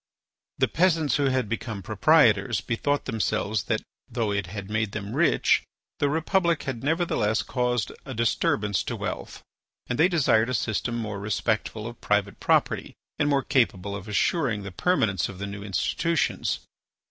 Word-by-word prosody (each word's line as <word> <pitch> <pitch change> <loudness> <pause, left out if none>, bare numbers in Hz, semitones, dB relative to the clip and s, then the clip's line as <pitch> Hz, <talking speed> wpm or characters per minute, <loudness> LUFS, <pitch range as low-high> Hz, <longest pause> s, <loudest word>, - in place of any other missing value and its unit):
The - - +3
peasants 160 -5 +2
who 145 - +1
had 130 -4 +1
become 110 -2 -4
proprietors 110 - +4
bethought 145 +4 -1
themselves 110 -3 -1
that 110 +1 -1 0.3
though 115 -3 -1
it 100 -2 -1
had 100 +1 -6
made 110 0 -1
them 100 -1 -5
rich, - - +3 0.4
the 145 - +2
Republic 170 +2 +1
had 130 -3 -4
nevertheless 145 -9 +1
caused 125 -3 -1
a 135 -3 -7
disturbance 105 -3 +1
to - - -3
wealth, - - -5 0.4
and 125 - -3
they 165 - +6
desired 130 -10 +3
a 130 - 0
system 120 +1 -1
more 105 -3 -3
respectful 110 +1 -1
of 115 0 -8
private 105 -1 0
property - - +1 0.2
and 145 - +2
more 140 -2 +2
capable 100 -8 +1
of 100 +1 -8
assuring 110 - +1
the 100 - -6
permanence 100 - +1
of 95 - -9
the 100 - -4
new 100 0 -6
institutions. 100 - 0
115 Hz, 160 wpm, -26 LUFS, 100-140 Hz, 0.4 s, they